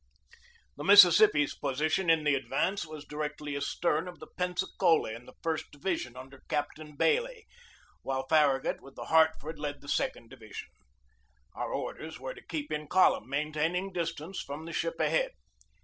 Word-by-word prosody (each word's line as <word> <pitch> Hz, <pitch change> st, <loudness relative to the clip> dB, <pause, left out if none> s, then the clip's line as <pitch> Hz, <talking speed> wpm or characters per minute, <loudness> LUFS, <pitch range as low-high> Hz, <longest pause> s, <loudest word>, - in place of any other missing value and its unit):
The -, -, -6 dB
Mississippi's 195 Hz, -5 st, +7 dB
position 155 Hz, +6 st, 0 dB
in 165 Hz, -1 st, +4 dB
the 150 Hz, -1 st, +3 dB
advance 160 Hz, +8 st, -1 dB
was 155 Hz, -2 st, -9 dB
directly 150 Hz, -1 st, -4 dB
astern 150 Hz, +4 st, 0 dB
of 175 Hz, -2 st, -9 dB
the 155 Hz, -, -10 dB
Pensacola 180 Hz, -, 0 dB
in 115 Hz, +2 st, -9 dB
the -, -, -14 dB
first 160 Hz, -2 st, -2 dB
division 145 Hz, -5 st, -3 dB
under 135 Hz, +1 st, -11 dB
Captain 150 Hz, +1 st, -3 dB
Bailey, 480 Hz, -, +1 dB, 0.6 s
while 135 Hz, 0 st, -2 dB
Farragut 140 Hz, -2 st, +2 dB
with 135 Hz, 0 st, -14 dB
the -, -, -7 dB
Hart 160 Hz, 0 st, +6 dB
ford 155 Hz, +1 st, -7 dB
led 145 Hz, -1 st, -4 dB
the 140 Hz, -, -14 dB
second 115 Hz, -4 st, -2 dB
division. 110 Hz, -1 st, -9 dB, 0.8 s
Our -, -, -4 dB
orders 160 Hz, 0 st, -5 dB
were 130 Hz, 0 st, -5 dB
to -, -, -13 dB
keep 155 Hz, -3 st, -5 dB
in 150 Hz, 0 st, -3 dB
column, 180 Hz, -9 st, +3 dB
maintaining 155 Hz, +6 st, -1 dB
distance 165 Hz, +1 st, -3 dB
from 145 Hz, +3 st, -7 dB
the 165 Hz, -, -7 dB
ship -, -, -2 dB
ahead. -, -, +1 dB
155 Hz, 160 wpm, -30 LUFS, 145-175 Hz, 0.8 s, Mississippi's